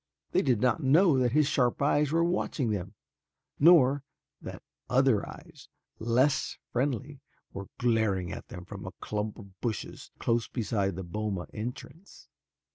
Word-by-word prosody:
They - - +3
did 120 -5 +1
not 125 +6 +2
know 155 +4 +5
that 125 -2 +1
his 150 0 +4
sharp 125 -3 +1
eyes 145 0 +2
were 165 +1 +3
watching 165 -8 0
them, 100 0 -4 0.6
nor 145 -4 +6 0.4
that - - -8 0.3
other 130 -4 +3
eyes - - -13 0.3
less 125 +5 +1
friendly 135 +2 -2 0.3
were 100 0 -6
glaring 110 -7 +1
at - - -8
them 90 -2 -9
from 95 0 -8
a 95 - -7
clump 105 0 -3
of 100 -3 -14
bushes 115 -4 -4
close 115 -1 0
beside 100 -6 -1
the 95 - -5
boma 95 0 -3
entrance. 125 - -8
120 Hz, 145 wpm, -29 LUFS, 105-140 Hz, 0.6 s, nor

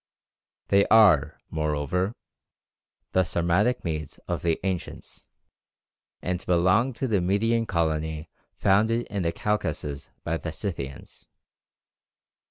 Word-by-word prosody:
They 100 0 +4
are, 105 -11 +5
moreover, 80 +6 -1 1.0
the 95 - +3
Sarmatic 90 +8 +1
Medes 75 -3 -4
of - - -2
the 85 -2 +1
ancients, 95 -3 -5 1.0
and 90 0 -2
belong 95 +8 +3
to 130 +3 -2
the 105 -6 +1
Median 115 +5 +1
colony 80 -2 -1 0.3
founded 110 +5 +2
in 100 -2 -1
the 85 -1 0
Caucasus 85 -9 -2
by 85 - -1
the 80 - -5
Scythians. 80 -6 -6
90 Hz, 105 wpm, -26 LUFS, 80-105 Hz, 1.0 s, are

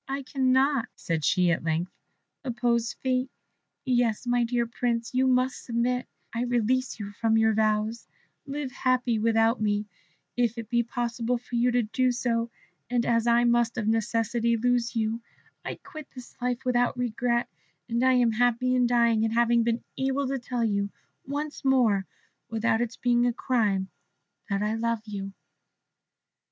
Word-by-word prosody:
"I 275 +1 -3
cannot," 260 -1 +2
said 165 -5 -3
she 180 +2 +3
at 165 - -1
length, 165 +2 -1 0.5
"oppose 235 -2 0
fate; 255 0 -1 0.6
yes, 245 -3 +1
my 245 0 +2
dear 235 0 0
Prince, 235 0 -2
you 260 +1 +3
must 255 0 +1
submit; 245 +1 -1 0.3
I 235 - -1
release 245 +1 0
you 205 -1 -5
from 225 +1 +1
your 220 0 +4
vows, 215 +1 0 0.4
live 280 -1 -4
happy 250 -3 +1
without 225 +1 +2
me, 210 0 +1 0.5
if 240 -1 +1
it 225 -2 -6
be 235 0 +3
possible 240 0 -2
for 245 +1 -17
you 240 +1 +3
to 245 0 +2
do 250 +4 +1
so; 235 -1 -1 0.4
and 245 -1 +1
as 230 0 +2
I 235 0 +4
must 235 -1 +2
of 215 -3 -1
necessity 230 +1 +1
lose 240 0 +1
you, 225 +1 -1 0.4
I - - -4
quit 310 -2 -11
this 250 -1 -11
life 250 +1 -2
without 245 0 +1
a - - -6
regret, 235 0 0 0.4
and 235 +1 0
am 250 -3 +4
happy 245 +2 +2
in 250 -1 +3
dying 235 -2 +3
at 225 0 0
having 235 0 +3
been 230 0 0 0.2
able 270 +1 0
to 270 0 -1
tell 245 -1 -2
you 200 -2 0 0.4
once 290 +2 -4
more 235 -8 +3 0.4
without 225 0 +1
its 240 -1 -3
being 240 0 +2
a 240 - +1
crime 210 -7 0 0.6
that 200 0 0
I 210 +1 0
love 230 -1 -1
you." 195 -2 -6
235 Hz, 165 wpm, -27 LUFS, 225-250 Hz, 0.6 s, your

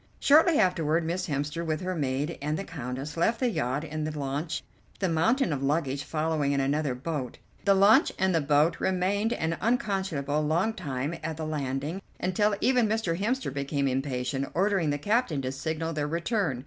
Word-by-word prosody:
Shortly 315 +2 +5
afterward 170 -4 +2
Miss 180 +3 -2
Hemster, 150 +2 -2
with 155 -2 -2
her 185 0 -2
maid 145 0 -2
and 150 +2 -1
the 195 - -3
Countess, 140 -2 -6
left 225 +8 +2
the 250 -2 +1
yacht 130 - -1
in 155 0 -4
the 155 0 -4
launch, 145 +3 -3 0.3
the 190 - 0
mountain 220 - +2
of 135 - -3
luggage 140 -1 0
following 155 -2 0
in 140 - +1
another 140 0 0
boat. 130 -1 -4 0.3
The 200 -1 +5
launch 210 - +6
and 190 0 +2
the 165 - +2
boat 150 +3 +3
remained 195 +4 +1
an 165 -3 -2
unconscionably 190 - 0
long 170 +9 +1
time 140 -4 -3
at 160 -1 -4
the 160 - -3
landing, 145 +3 -3 0.2
until 205 +3 +1
even 250 -3 +3
Mr. 215 -6 0
Hemster 215 - -1
became 140 0 -1
impatient, 135 0 -2
ordering 190 -3 +2
the 145 - 0
captain 205 - +1
to 130 - -2
signal 160 +4 -3
their 150 -1 -1
return. 170 - -1
160 Hz, 180 wpm, -28 LUFS, 140-190 Hz, 0.3 s, launch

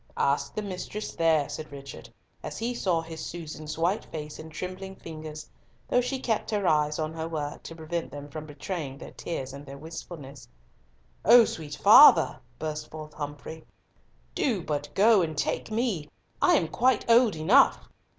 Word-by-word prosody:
"Ask 140 +1 0
the 215 - -2
mistress, 200 +2 -5
there," 160 -3 +2
said 155 -1 -7
Richard, 140 -1 -10 0.3
as - - -6
he 235 +2 -2
saw 180 -8 0
his 160 -1 -8
Susan's 155 -2 -6
white 175 +6 +1
face 150 -1 -7
and 160 0 -9
trembling 185 +3 -6
fingers, 155 -3 -8 0.4
though 245 - +3
she 255 +2 -2
kept 230 -4 -1
her 205 -4 0
eyes 150 0 +2
on 155 0 -2
her 160 0 -4
work 150 -3 -4
to 165 - -9
prevent 165 +1 -4
them 145 0 -8
from 155 +1 -8
betraying 145 -1 -5
their - - -10
tears 135 -6 -5
and 140 +1 -9
their 140 -1 -10
wistfulness. 150 -3 -9 0.8
"O 235 +3 +8
sweet 150 -6 -6
father," - - +8 0.2
burst 155 -1 -4
forth 155 -1 -9
Humfrey, 145 +2 -7 0.7
"do 215 -10 0
but 145 -1 -3
go, 210 0 +6
and 160 -3 -2
take - - -1
me. 215 -9 -1 0.3
I - - +5
am 165 - +2
quite 245 +7 +1
old 230 -4 +5
enough." 200 - +4
160 Hz, 170 wpm, -27 LUFS, 150-195 Hz, 0.8 s, O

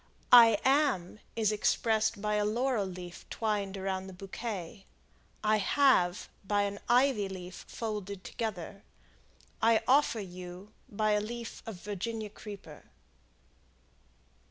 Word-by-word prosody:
"I 230 -3 +9
am," 265 - +2 0.2
is 220 -2 +2
expressed 220 0 +1
by 210 0 0
a 210 0 +2
laurel 230 0 0
leaf 180 -1 -8
twined 205 -3 -2
around 190 0 -3
the 190 - -9
bouquet. 195 0 -6 0.6
"I 215 0 +4
have," 205 -6 +3 0.2
by 205 +1 +1
an 200 0 -3
ivy 245 -5 +3
leaf 180 -2 -8
folded 205 -4 -5
together. 200 -3 -5 0.8
"I 225 0 +4
offer 260 -3 +4
you," 185 +1 -9 0.2
by 215 +1 0
a 210 0 +2
leaf 235 +2 -6
of 225 - -5
Virginia 210 +3 -5
creeper. 205 -1 -10
210 Hz, 120 wpm, -31 LUFS, 190-225 Hz, 0.8 s, I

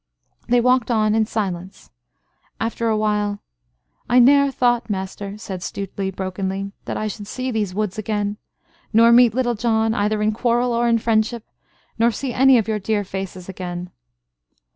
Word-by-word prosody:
They 240 0 +3
walked 250 0 +2
on 215 -2 +2
in 220 -1 +2
silence. 190 - -4 0.7
After 230 +1 -2
a 220 - +1
while, 210 -1 0 0.7
"I 245 - +4
ne'er 280 +3 +6
thought, 245 -3 +1
master," 200 +1 -4
said 195 -3 -6
Stuteley, 195 +1 -4
brokenly, 190 +1 -4
"that - - -3
I 215 - -2
should 205 -1 -6
see 255 +3 -3
these 210 -5 -2
woods 210 0 -2
again 210 -1 -2 0.5
nor 230 +1 +6
meet 235 -2 +6
Little 250 -2 +1
John, 220 -1 +1
either 210 0 0
in 215 - +2
quarrel 240 +2 +1
or 235 +1 +1
in 230 0 +3
friendship, 225 0 0 0.5
nor 230 +1 +5
see 245 +3 -4
any 265 +1 +5
of 225 - 0
your 215 -1 -1
dear 210 +1 -1
faces 190 -1 -6
again." 180 -1 -6
215 Hz, 165 wpm, -21 LUFS, 200-235 Hz, 0.7 s, ne'er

